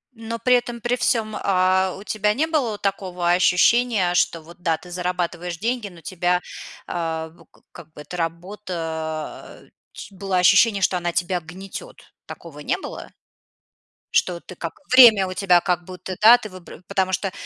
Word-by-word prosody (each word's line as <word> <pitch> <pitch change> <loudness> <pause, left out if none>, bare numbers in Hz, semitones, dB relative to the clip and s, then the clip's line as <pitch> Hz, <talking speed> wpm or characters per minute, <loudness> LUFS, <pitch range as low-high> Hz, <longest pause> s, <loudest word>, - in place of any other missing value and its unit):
Но 230 +1 -5
при 250 0 +4
этом 240 -1 -2
при 245 +1 0
всём, 220 -3 0
э, 185 -1 +1
у 200 - -10
тебя 210 -1 0
не 310 +4 +1
было 255 -10 -1
такого 185 -3 -1
ощущения, 185 +2 +3
что 165 -2 +1
вот 170 +2 -15
да, 165 -3 +1
ты 180 - -14
зарабатываешь 180 -1 -3
деньги, 235 +1 -2
но 170 -2 -15
тебя, 180 +2 0 0.5
э, - - -7 0.4
в - - -21 0.2
как 165 -3 -13
бы 150 - -10
эта 180 +4 -8
работа, 165 -3 -5 0.2
э, - - -23 0.2
ч 195 -2 -11
было 190 -1 -2
ощущение, 200 +3 +5
что 180 - +2
она 175 0 -2
тебя 180 0 0
гнетёт? 190 - -9 0.3
Такого - - -10
не - - -1
было? - - -8 1.1
Что 175 -2 +2
ты 185 - -12
как 165 -2 -7
время 230 -7 +8
у 185 - -5
тебя 180 -2 +4
как 175 -1 -1
будто, 185 0 -7
да, 235 +3 +9
ты 220 - -8
выб 185 -3 -13 0.2
потому 190 -1 0
что 195 0 -1
185 Hz, 170 wpm, -22 LUFS, 175-210 Hz, 1.1 s, да